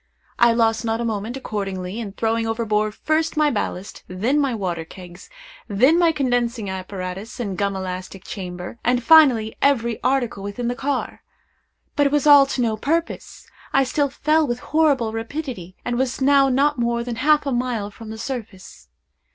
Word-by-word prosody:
I 235 Hz, 0 st, +6 dB
lost 225 Hz, 0 st, +1 dB
not 225 Hz, 0 st, -1 dB
a 235 Hz, -, -2 dB
moment, 220 Hz, +3 st, -3 dB
accordingly, 195 Hz, -4 st, -4 dB
in 210 Hz, -4 st, -6 dB
throwing 225 Hz, +1 st, -1 dB
overboard 215 Hz, -2 st, -1 dB
first 315 Hz, +3 st, -1 dB
my 300 Hz, -1 st, +3 dB
ballast, 200 Hz, -3 st, -4 dB
then 225 Hz, +11 st, 0 dB
my 275 Hz, -4 st, 0 dB
water 180 Hz, -6 st, -3 dB
kegs, 175 Hz, +1 st, -13 dB, 0.4 s
then 255 Hz, -, +4 dB
my 340 Hz, -2 st, +4 dB
condensing 245 Hz, -7 st, -1 dB
apparatus 190 Hz, +4 st, -6 dB
and 200 Hz, -6 st, -3 dB
gum 200 Hz, +1 st, -1 dB
elastic 185 Hz, 0 st, -6 dB
chamber, 180 Hz, +2 st, -7 dB
and 245 Hz, 0 st, +1 dB
finally 250 Hz, -7 st, +5 dB
every 235 Hz, -5 st, +1 dB
article 255 Hz, -5 st, 0 dB
within 205 Hz, +5 st, -4 dB
the -, -, -1 dB
car. 280 Hz, +2 st, -3 dB, 0.7 s
But 290 Hz, -1 st, +3 dB
it -, -, -2 dB
was 295 Hz, -1 st, +1 dB
all 285 Hz, -2 st, +8 dB
to 265 Hz, -, -2 dB
no 220 Hz, -2 st, 0 dB
purpose. 330 Hz, +8 st, -3 dB, 0.3 s
I 270 Hz, -, +4 dB
still 280 Hz, +2 st, 0 dB
fell 305 Hz, +3 st, +1 dB
with 240 Hz, 0 st, -2 dB
horrible 280 Hz, -8 st, +2 dB
rapidity, 225 Hz, -, -5 dB
and 240 Hz, 0 st, -1 dB
was 260 Hz, -1 st, -1 dB
now 275 Hz, 0 st, +4 dB
not 275 Hz, +1 st, +2 dB
more 235 Hz, 0 st, 0 dB
than 235 Hz, -1 st, -5 dB
half 300 Hz, +3 st, +3 dB
a 280 Hz, -, -1 dB
mile 240 Hz, -4 st, -2 dB
from 220 Hz, +2 st, -11 dB
the 220 Hz, -, -7 dB
surface. 225 Hz, -6 st, -7 dB
235 Hz, 175 wpm, -22 LUFS, 205-275 Hz, 0.7 s, all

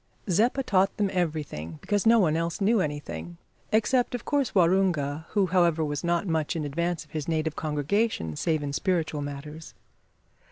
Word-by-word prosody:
Zeppa 235 Hz, +9 st, +2 dB
taught 195 Hz, -4 st, +2 dB
them 205 Hz, -2 st, +1 dB
everything, 150 Hz, -, -3 dB
because 205 Hz, +1 st, 0 dB
no 230 Hz, +1 st, +7 dB
one 165 Hz, -8 st, +3 dB
else 165 Hz, 0 st, -2 dB
knew 210 Hz, +1 st, +3 dB
anything, 85 Hz, -, -5 dB, 0.3 s
except 245 Hz, +3 st, +2 dB
of 240 Hz, -, -6 dB
course 280 Hz, -7 st, 0 dB
Waroonga, 170 Hz, -5 st, +2 dB
who, 205 Hz, -2 st, +3 dB
however, 170 Hz, -3 st, +2 dB
was 145 Hz, +1 st, -3 dB
not 170 Hz, +2 st, +1 dB
much 160 Hz, -1 st, -1 dB
in 155 Hz, -2 st, -2 dB
advance 170 Hz, +3 st, -2 dB
of 150 Hz, -, -28 dB
his 155 Hz, -2 st, -4 dB
native 160 Hz, -1 st, -1 dB
congregation 150 Hz, -, -1 dB
save 155 Hz, -, 0 dB
in 140 Hz, -1 st, -3 dB
spiritual 165 Hz, -4 st, 0 dB
matters. 145 Hz, +2 st, -7 dB
165 Hz, 165 wpm, -27 LUFS, 150-195 Hz, 0.3 s, no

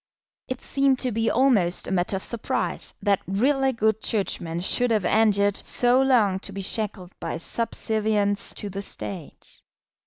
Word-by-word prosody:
It 255 Hz, 0 st, -5 dB
seemed 275 Hz, -1 st, +1 dB
to 255 Hz, -, 0 dB
be 225 Hz, +1 st, 0 dB
almost 220 Hz, -10 st, +2 dB
a -, -, -4 dB
matter 180 Hz, +1 st, 0 dB
of 190 Hz, -, -4 dB
surprise 235 Hz, -2 st, -1 dB
that 200 Hz, -2 st, +2 dB
really 265 Hz, +8 st, +2 dB
good 220 Hz, -2 st, 0 dB
Churchmen 175 Hz, -6 st, -2 dB
should 245 Hz, +6 st, +2 dB
have 215 Hz, -5 st, +1 dB
endured 205 Hz, -1 st, +3 dB
so 245 Hz, +1 st, +3 dB
long 225 Hz, -8 st, +3 dB
to 200 Hz, -, -6 dB
be 195 Hz, 0 st, -6 dB
shackled 200 Hz, -3 st, -3 dB
by -, -, -4 dB
subservience 215 Hz, +1 st, -1 dB
to 205 Hz, -, -5 dB
the 195 Hz, +2 st, -5 dB
State. 185 Hz, -4 st, -7 dB
210 Hz, 155 wpm, -24 LUFS, 195-240 Hz, -, endured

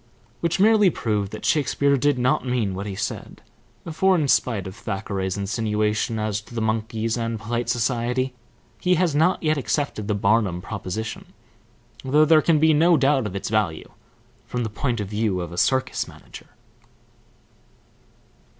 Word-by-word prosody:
Which 170 Hz, +2 st, -1 dB
merely 210 Hz, -1 st, +5 dB
proved 105 Hz, -, -2 dB
that 110 Hz, -, -7 dB
Shakespeare 140 Hz, -1 st, +2 dB
did 145 Hz, +1 st, +1 dB
not 125 Hz, +1 st, +1 dB
mean 125 Hz, -6 st, -1 dB
what 100 Hz, +2 st, -5 dB
he 100 Hz, -, -5 dB
said; 105 Hz, -, -5 dB, 0.5 s
for 190 Hz, +4 st, +3 dB
in 155 Hz, -5 st, +1 dB
spite 115 Hz, -6 st, +1 dB
of 95 Hz, +1 st, -7 dB
Thackeray's 95 Hz, -3 st, -3 dB
insinuation 105 Hz, +1 st, -1 dB
as 105 Hz, -1 st, -2 dB
to 110 Hz, +2 st, -14 dB
the -, -, -1 dB
monkeys 110 Hz, +1 st, -1 dB
and 115 Hz, -1 st, -3 dB
polite 120 Hz, +1 st, -3 dB
society, 125 Hz, +2 st, 0 dB, 0.5 s
he 180 Hz, 0 st, +2 dB
has 175 Hz, -2 st, +1 dB
not 160 Hz, +6 st, +2 dB
yet 155 Hz, -2 st, +1 dB
accepted 135 Hz, -6 st, -2 dB
the 105 Hz, -, 0 dB
Barnum 100 Hz, -3 st, +1 dB
proposition, 105 Hz, +3 st, -6 dB, 0.7 s
though 150 Hz, +4 st, +4 dB
there 155 Hz, 0 st, +5 dB
can 160 Hz, +1 st, +3 dB
be 160 Hz, +1 st, +4 dB
no 165 Hz, +3 st, +4 dB
doubt 135 Hz, -4 st, +2 dB
of 100 Hz, -, -7 dB
its 100 Hz, -, -4 dB
value 105 Hz, -7 st, -1 dB, 0.6 s
from 125 Hz, -1 st, -2 dB
the 110 Hz, -, -4 dB
point 120 Hz, +1 st, -2 dB
of 105 Hz, -, -3 dB
view 105 Hz, -2 st, -1 dB
of 85 Hz, -1 st, -5 dB
a 85 Hz, -, -8 dB
circus 130 Hz, -1 st, +1 dB
manager. -, -, -13 dB
115 Hz, 160 wpm, -23 LUFS, 105-145 Hz, 0.7 s, merely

